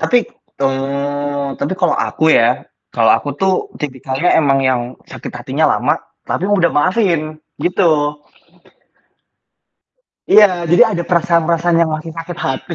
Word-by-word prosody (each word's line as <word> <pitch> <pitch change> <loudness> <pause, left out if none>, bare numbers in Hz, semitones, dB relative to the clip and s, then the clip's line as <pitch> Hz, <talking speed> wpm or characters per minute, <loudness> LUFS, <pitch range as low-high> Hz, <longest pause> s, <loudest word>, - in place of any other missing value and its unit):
Tapi, 245 -2 +2 0.3
teng 135 -1 +1 0.8
tapi 145 - -2
kalau 180 - +2
aku 160 0 0
ya, 120 +2 +2 0.2
kalau - - +2
aku - - -2
tuh 190 +3 +1 0.3
tipikalnya 135 +3 -2
emang 140 -3 +2
yang 130 -2 +1 0.3
sakit - - -9
hatinya - - -2
lama, - - 0 0.3
tapi 185 - -2
mudah 175 -5 +3
maafin 165 -3 0 0.2
gitu. 155 -5 +1 2.1
Iya, 185 -5 +5
jadi 175 +6 +4
ada 170 - -1
perasaan-perasaan 170 0 +1
yang 160 - -3
masih 155 +1 -5
sakit 165 +1 -7
hati, 135 +6 -3
165 Hz, 125 wpm, -16 LUFS, 145-175 Hz, 2.1 s, Iya